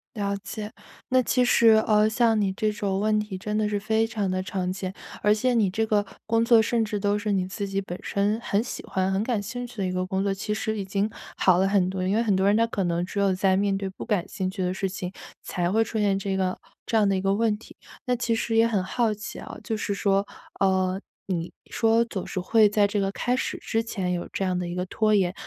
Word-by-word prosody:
了 200 -1 -1
解， 210 +1 -7 0.4
那 255 0 +4
其 250 +1 +2
实 235 -2 +5 0.2
呃， 215 0 +4
像 225 -1 +3
你 195 -2 +1
这 215 +2 0
种 200 -2 -2
问 215 0 +2
题 210 -3 -4
真 210 +2 -3
的 215 -1 +1
是 205 -1 -1
非 220 +2 +1
常 210 -4 -2
的 185 0 -1
常 185 -1 -2
见， 190 0 -4 0.3
而 210 +1 +4
且 250 +3 +1
你 215 -5 +3
这 220 +4 0
个 210 -2 +1 0.2
工 225 +1 +2
作 230 -1 +6
甚 230 +1 +1
至 210 -1 -3
都 205 +1 +1
是 210 -1 -2
你 185 -1 +1
自 195 +2 -4
己 195 0 -1
本 180 -1 -7
身 205 +2 0
很 205 +1 0
喜 - - -6
欢、 190 0 -1
很 195 +1 +1
感 225 -4 0
兴 245 +4 -5
趣 240 - -15
的 195 - -1
一 180 - -1
个 185 0 -1
工 190 +1 -1
作， 200 -1 +1
其 205 +2 -3
实 220 0 -2
已 195 - -3
经 200 +2 0 0.3
好 185 -2 +4
了 190 +1 +3
很 195 -2 +2
多。 185 -1 -3
因 200 - +1
为 230 - +2
很 210 -3 +2
多 190 +1 +2
人 205 - +4
他 230 +1 +4
可 195 -5 -2
能 170 +1 0
只 200 - -4
有 195 -1 +3
在 190 0 +2
面 200 -1 +1
对 195 -1 -3
不 190 - -8
感 205 -7 0
兴 190 -2 -2
趣 190 0 -5
的 180 +1 0
事 195 0 -1
情， 185 -1 -5 0.3
才 175 -1 -1
会 220 +3 +3
出 220 0 -3
现 200 -2 +2
这 195 0 -2
个 185 -1 0 0.3
这 225 - -2
样 210 -2 +4
的 195 - +2
一 - - 0
个 195 0 +2
问 220 0 +2
题。 225 - -15 0.3
那 250 0 +1
其 235 -1 0
实 225 0 -1
也 225 +1 +6
很 210 -5 +1
好 225 +2 0
奇 210 -1 -8
啊， - - -8
就 220 - -1
是 210 -1 -2
说， 200 0 +1 0.4
呃， 190 -1 +2 0.3
你 175 -3 -3 0.2
说 225 +1 +3
“总 190 - -4
是 - - -4
会 215 +3 +4
在 205 -1 +3
这 200 0 -1
个 195 - 0
开 245 +5 0
始 - - -2
之 225 0 -1
前 190 -6 -2
有 175 - -4
这 195 - -1
样 180 -1 0
的 180 - -2
一 175 - -4
个 180 0 -2
拖 215 +3 +1
延”， 185 -3 +2
205 Hz, 285 characters per minute, -25 LUFS, 190-220 Hz, 0.4 s, 作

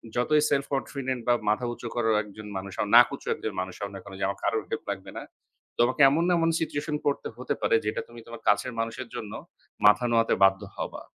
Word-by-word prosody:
যতই 150 +5 +3
সেলফ-কনফিডেন্ট 135 -2 -2
বা 120 - +5 0.2
মাথা 110 +4 +1
উঁচু 120 - -7
করে 115 -2 +1
একজন 105 +1 -11
মানুষ 95 0 -6
হও - - 0
না, 105 - -7
নাক 120 - +9
উঁচু - - -15
একজন 110 - -5
মানুষ 95 0 -6
হও 100 - -3
না - - -6
কেন, 100 - -11
যে - - -2
আমার 100 0 -4
কারো - - +1
হেল্প - - -3
লাগবে - - -7
না, - - -5 0.6
তোমাকে 130 +5 +3
এমন 160 +4 +1
এমন 165 0 +2
সিচুয়েশন 150 -1 -2
পড়তে 145 - 0
হতে 125 - -2
পারে, - - +3
যেটা 105 - -1
তুমি 120 0 -12
তোমার 115 -1 -9
কাছের 105 +4 +2
মানুষের 115 +2 -3
জন্য 105 -2 -6 0.5
মাথা 105 +3 +6
নোয়াতে 115 -1 +3
বাধ্য 95 0 +5 0.2
হবা। - - -5
115 Hz, 215 wpm, -27 LUFS, 105-130 Hz, 0.6 s, নাক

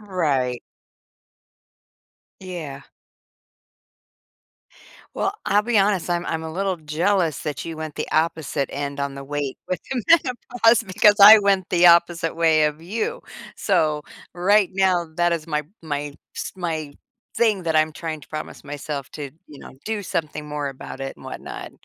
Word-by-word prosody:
Right. 145 - -1 1.8
Yeah. 165 -7 -7 2.3
Well, 390 - 0
I'll 205 +1 +3
be 230 -1 +2
honest. 195 -3 +1
I'm 175 0 -1
I'm 160 0 -2
a 160 - -5
little 190 +1 -1
jealous 165 +2 0
that 150 -3 -4
you 165 -1 -6
went 155 -1 -6
the - - -4
opposite 155 -3 0
end 140 0 -4
on 140 0 -2
the 140 - -7
weight 145 -1 -3
with 185 - -1
the 255 -3 -2
menopause 245 -6 +3
because 205 +1 +4
I 215 +2 +12
went 200 -3 +1
the 175 0 +5
opposite 170 -1 +4
way 160 -2 +4
of 150 +1 -2
you. 230 - -3 0.4
So, 155 -6 +1 0.3
right 195 +2 +3
now, 185 -3 +2
that 175 0 +2
is 165 -2 -3
my 150 -2 -1 0.2
my, 145 -2 -4 0.2
s - - -4
my 160 -5 -4 0.4
thing 215 -5 +2
that 160 -2 0
I'm 155 0 +3
trying 160 -1 -5
to - - -15
promise 155 0 -7
myself 145 -1 -5
to, 145 -3 -7 0.2
you 145 - -13
know, - - -11
do 220 -1 -2
something 155 -4 -3
more 145 -1 -3
about 135 0 -9
it 135 0 -5
and - - -16
whatnot. - - -7
165 Hz, 155 wpm, -23 LUFS, 150-190 Hz, 2.3 s, I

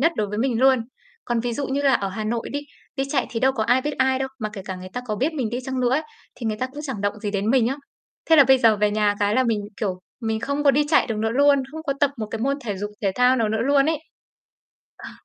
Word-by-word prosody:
nhất 330 +4 +3
đối 210 - 0
với 210 +1 -4
mình 235 -1 0
luôn. 260 -3 +4 0.4
Còn 240 -1 0
ví 240 0 -2
dụ 275 +4 -3
như 275 +2 -1
là 270 -2 +4
ở 195 - 0
Hà 215 +3 -5
Nội 230 +1 -2
đi, 285 - -2 0.4
đi 270 - 0
chạy 270 -4 +1
thì 230 - -3
đâu 265 +1 +3
có 225 -5 -1
ai 245 +4 +3
biết 295 +1 -2
ai 260 0 +2
đâu, 265 0 -2
mà 215 -3 -3
kể 195 -3 -7
cả 190 -1 -5
người 185 0 -9
ta 250 - -3
có 215 - -2
biết 275 +9 0
mình 255 -7 -2
đi 245 - -2
chăng 260 -1 -3
nữa 245 -1 +2
ấy, 285 +4 +2 0.3
thì 235 - -6
người 215 -1 -1
ta 255 - -2
cũng 285 +3 -9
chẳng 265 -8 -5
động 205 +1 -1
gì 205 - -3
đến 200 +2 -1
mình 255 -3 +4
á. 270 +4 -1 0.5
Thế 320 - +8
là 280 - +8
bây 265 0 +5
giờ 225 -3 +4
về 210 0 +2
nhà 210 -1 +2
cái 205 +1 +2
là 260 +1 +3
mình, 220 -3 0 0.2
kiểu, 190 -4 -3 0.2
mình 220 -1 -2
không 280 +3 -2
có 280 - +7
đi 290 +2 +2
chạy 310 - +4
được 225 - -3
nữa 220 +1 0
luôn, 280 +2 +4
không 315 - -6
có 285 -3 -1
tập 285 -1 +4
một 215 - -3
cái 225 - -4
môn 275 +3 0
thể 205 -5 -4
dục 205 +2 -4
thể 195 -2 +1
thao 250 +1 +4
nào 225 -3 +1
nữa 220 +1 -1
luôn 275 +2 +3
ấy. 320 -1 +1 1.1
Ờ. - - -7
245 Hz, 305 wpm, -23 LUFS, 215-270 Hz, 1.1 s, Thế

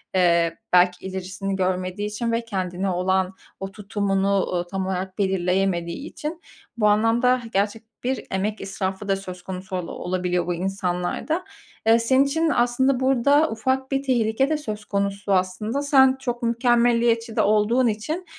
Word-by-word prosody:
eee, 170 -2 +3 0.2
belki 180 0 +4
ilerisini 190 +1 -4
görmediği 185 +2 -1
için 230 +3 -2
ve 230 0 -1
kendine 190 -2 -2
olan 185 +1 0 0.3
o 195 0 -5
tutumunu, 200 -1 -1
ooo, 175 -1 -2
tam 190 +1 -3
olarak 190 0 -3
belirleyemediği 190 - 0
için. 315 +2 -6 0.4
Bu 210 -2 +3
anlamda 230 +4 +3
gerçek 205 +3 0 0.2
bir 260 +1 -2
emek 205 +3 -2
israfı 195 +1 -4
da 195 - +2
söz 185 -2 -8
konusu 185 0 -6
ola 180 -2 -4
olabiliyor 180 -1 -2
bu 175 - 0
insanlarda. 185 - -2 0.4
Eee, 230 +1 +6
senin 260 +4 +4
için 320 +3 +1
aslında 250 +1 +2
burada 275 +4 +3
ufak 260 +4 -1
bir 275 0 0
tehlike 250 0 +1
de 310 - +1
söz 215 -8 -6
konusu 200 0 -1
aslında. 190 +8 0
Sen 265 -2 +5
çok 245 -2 -4
mükemmeliyetçi 235 -1 +2
de - - +3
olduğun 215 +4 +3
için, 305 - -3
205 Hz, 150 wpm, -23 LUFS, 185-240 Hz, 0.4 s, Eee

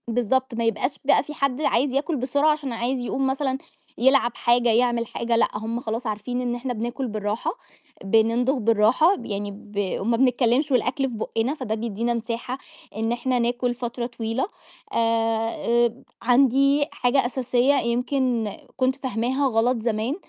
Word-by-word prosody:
بالضبط، 245 +2 0
ما 230 - -1
يبقاش 230 +4 0
بقى 285 - +4
فيه 300 - -8
حد 275 -1 -1
عايز 270 -2 +2
ياكل 290 +5 0
بسرعة، 285 +4 +2
عشان 290 -5 -3
عايز 245 +2 -2
يقوم 270 +2 -1
مثلًا 265 0 -1 0.4
يلعب 255 -1 +4
حاجة، 240 0 +3
يعمل 235 0 +2
حاجة، 235 +1 -1
لأ، 230 - +4
هم 225 +2 -3
خلاص 230 0 -4
عارفين 220 +4 -3
إن 245 -1 -1
إحنا 245 +1 -3
بناكل 240 +4 -3
بالراحة، 210 0 -2 0.5
بنمضغ 230 +6 +2
بالراحة، 230 - +4
ب - - -9
يعني 205 0 -3
ب 205 -1 -4
وما 230 +3 +1
بنتكلمش 255 +3 +2
والأكل 260 +2 +1
في 240 - -7
بُقّنا، 225 +4 -1
فده 255 -8 -3
بيدّينا 230 +1 -2
مساحة 235 +2 -4 0.4
إن 225 +1 -1
إحنا 245 +1 0
ناكل 245 +1 0
فترة 240 0 -4
طويلة، 230 +1 -3 0.5
آآ، - - 0 0.9
آآ 230 - -12 0.2
عندي 275 +3 +4
حاجة 255 +1 +1
أساسية 250 +1 +1
يمكن 245 -2 0 0.3
كنت 260 0 +2
فاهماها 260 +1 -1
غلط 240 +1 +2
زمان، 225 +4 -1
245 Hz, 155 wpm, -24 LUFS, 230-265 Hz, 0.9 s, بقى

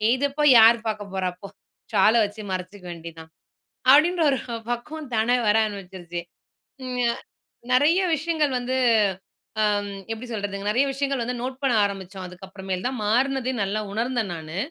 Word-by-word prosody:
"இதப்போய் 285 +2 +2
யார் 225 +1 +8
பார்க்க 205 -2 -4
போறா 190 -1 0
போ? 200 - -7 0.5
சால 210 +1 +5
வச்சு 205 +1 -5
மறைச்சுக்க 185 +1 -6
வேண்டியது 165 -1 -9
தான்." 160 0 -15 0.6
அப்படீன்ற 330 +5 +5
ஒரு 270 - 0 0.3
பக்குவம் 290 +4 -5
தானா 225 +3 +2
வர 210 - +4
ஆரம்பிச்சுருச்சு. 185 -4 -7 0.6
ம். 250 -1 -4
அ - - -4 0.6
நெறைய 295 +8 +4 0.2
விஷயங்கள் 310 -2 0
வந்து 250 +1 -2 0.8
அம் 205 -1 +1 0.2
எப்படி 225 +3 -6
சொல்றதுங்க? 200 -2 -4
நெறைய 245 +6 +3
விஷயங்கள் 275 -1 -1
வந்து 245 +2 -2
நோட் 255 +1 -4
பண்ண 270 -2 +2
ஆரம்பிச்சோம். 190 -1 -5
அதுக்கப்புறமேல் 190 0 -6
தான் 260 - -1
மாறுனதே 260 +4 +1
நல்லா 200 +2 -1
உணர்ந்தேன் 230 -1 -1
நானு. 160 0 -7
220 Hz, 145 wpm, -24 LUFS, 195-260 Hz, 0.8 s, யார்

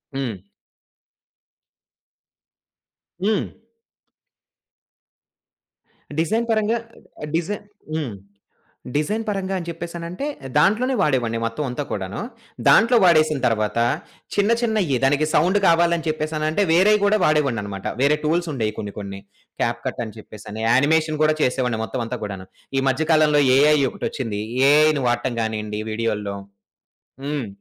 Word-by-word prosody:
హ్మ్. 125 -7 -3 2.9
హ్మ్. 210 -2 +1 2.7
డిజైన్ 220 +8 +1
పరంగా 220 +1 +2 0.4
ఆహ్, 150 - -4
డిజైన్ 175 +6 -2 0.3
హ్మ్. 145 -8 -3 0.8
డిజైన్ 210 +9 -1
పరంగా 195 -2 -2
అని 170 - -6
చెప్పేసనంటే 170 - -5 0.3
దాంట్లోనే 220 - +3
వాడేవాడిని 125 - +1
మొత్తం 115 +6 -2
అంతా 125 +4 -3
కూడాను. 95 -1 -4 0.5
దాంట్లో 235 +2 +6
వాడేసిన 155 -4 +4
తర్వాత 110 -1 0 0.6
చిన్న 205 +1 +2
చిన్నయి, 215 - +1
దానికి 145 +3 +3
సౌండ్ 180 +6 +3
కావాలని 170 0 +3
చెప్పేసనంటే 155 +3 -1
వేరేయి 205 +5 +5
కూడా 205 +1 +4
వాడేవాడినన్నమాట. 115 -11 0
వేరే 140 +3 +4
టూల్స్ 170 +2 +1
ఉండేవి. 110 -6 -1
కొన్ని 100 -1 -5
కొన్ని 100 -1 -6 0.4
క్యాప్‌కట్ - - -2
అని 110 -1 -10
చెప్పేసి, 110 -1 -12 0.3
యానిమేషన్ 155 +4 +2
కూడా 155 - +3
చేసేవాడిని. 125 -3 0
మొత్తం 125 +2 -3
అంతా 125 +1 -4
కూడాను 95 -2 -6 0.3
ఈ - - +1
మధ్య 155 +4 -1
కాలంలో 150 -2 +4
ఏఐ 150 +2 +5
ఒకటొచ్చింది. 115 -7 -4 0.3
ఏఐని 150 -1 +4
వాడటం 120 +1 -1
కానియండి 110 -1 -3
వీడియోల్లో. 105 -3 -2 0.9
హ్మ్. 145 -5 -2
150 Hz, 115 wpm, -22 LUFS, 115-170 Hz, 2.9 s, దాంట్లో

